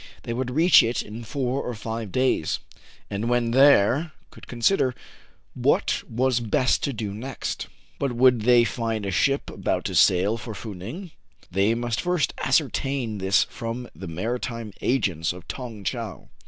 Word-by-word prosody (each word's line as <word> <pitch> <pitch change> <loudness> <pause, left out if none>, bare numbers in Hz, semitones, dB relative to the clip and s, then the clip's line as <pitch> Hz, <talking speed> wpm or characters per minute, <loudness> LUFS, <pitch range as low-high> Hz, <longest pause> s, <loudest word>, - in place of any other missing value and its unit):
They 115 - -3
would 125 +1 -2
reach 160 +7 +6
it 115 +2 -1
in 110 +3 -8
four 130 +3 -2
or 125 - -4
five 110 -1 -5
days, 130 -11 +1 0.5
and, 105 +4 -3
when 120 -1 +1
there, 140 +3 +5 0.2
could - - -14
consider 125 +1 +1 0.6
what - - +1
was 125 +1 +1
best 120 +2 +1
to 140 - -1
do 110 -5 -4
next. 125 +5 -5 0.3
But 140 -3 -1
would 125 -1 +4
they 120 +1 +5
find 115 -3 -2
a 100 - -2
ship 140 +9 +1
about - - -2
to - - -2
sail 95 +5 +4
for 110 -1 -7
Fou 105 +1 -7
Ning? 140 - -8 0.4
They 100 +5 +2
must 120 -3 -2
first 180 -4 0
ascertain 135 -5 0
this 95 0 +3
from 120 +1 -6
the 90 +3 -8
maritime 115 +4 -4
agents 95 - 0
of 90 0 -12
Tong 115 -6 -7
Tcheou. - - -5
115 Hz, 160 wpm, -25 LUFS, 105-130 Hz, 0.6 s, reach